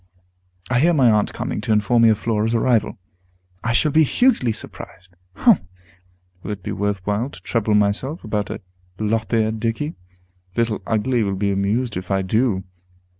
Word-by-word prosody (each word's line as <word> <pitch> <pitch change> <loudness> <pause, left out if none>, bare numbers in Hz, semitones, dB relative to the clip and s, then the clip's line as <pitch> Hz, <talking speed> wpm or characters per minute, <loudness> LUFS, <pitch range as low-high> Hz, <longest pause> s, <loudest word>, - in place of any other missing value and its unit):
I 125 - +3
hear 170 +4 +4
my 130 -5 +5
aunt 105 -1 +2
coming - - -4
to - - -2
inform 105 +3 +3
me 115 - +6
of 110 - +3
Flora's 110 +1 0
arrival. 115 -1 +1 0.7
I 115 - 0
shall 145 +6 +2
be 160 - +5
hugely 220 - +2
surprised! 90 -3 -9 0.2
Humph! 220 - +4 0.8
will - - -8
it 100 -3 -5
be - - -4
worth 100 -2 -2
while 105 +6 -1
to - - -12
trouble 110 -3 0
myself 105 - 0
about 105 -2 -2
the - - -6 0.4
lop 110 +1 -1
eared 110 -1 +1
dickey? 115 +8 -2 0.6
Little 115 -3 0
Ugly 115 +3 +1
will 100 -2 0
be 100 +1 0
amused, 100 +4 0
if 90 0 -7
I 95 -1 +1
do. 105 0 +1
110 Hz, 175 wpm, -21 LUFS, 105-120 Hz, 0.8 s, me